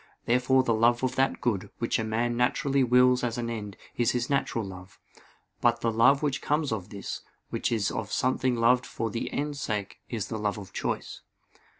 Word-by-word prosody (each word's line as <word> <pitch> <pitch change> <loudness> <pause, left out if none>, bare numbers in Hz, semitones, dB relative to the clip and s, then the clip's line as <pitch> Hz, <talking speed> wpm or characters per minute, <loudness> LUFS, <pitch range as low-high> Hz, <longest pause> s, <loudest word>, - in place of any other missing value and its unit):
Therefore 125 +2 +3
the 120 - +1
love 120 +3 +3
of 130 -1 +1
that 135 0 +1
good, 105 -6 -1
which 115 - 0
a - - 0
man 115 +2 0
naturally 135 +3 +2
wills 125 0 +4
as 120 -1 -1
an 115 -1 -2
end, 105 -4 -6 0.2
is 120 -1 +2
his 125 +2 -1
natural 120 -5 0
love; 95 0 -11 0.6
but 120 -1 +3
the 115 - +1
love 125 +6 +4
which 140 -2 0
comes 150 -2 0
of 100 -3 -3
this, 100 -2 -6 0.3
which - - -1
is 110 -3 +1
of 105 -1 -4
something 130 0 +1
loved 125 +2 +3
for 115 -1 -3
the 115 - -3
end's 145 -1 -3
sake, 105 -3 -3
is 110 -4 -3
the 110 - -3
love 105 0 -1
of 100 -2 -10
choice. - - -3
120 Hz, 200 wpm, -28 LUFS, 110-125 Hz, 0.6 s, wills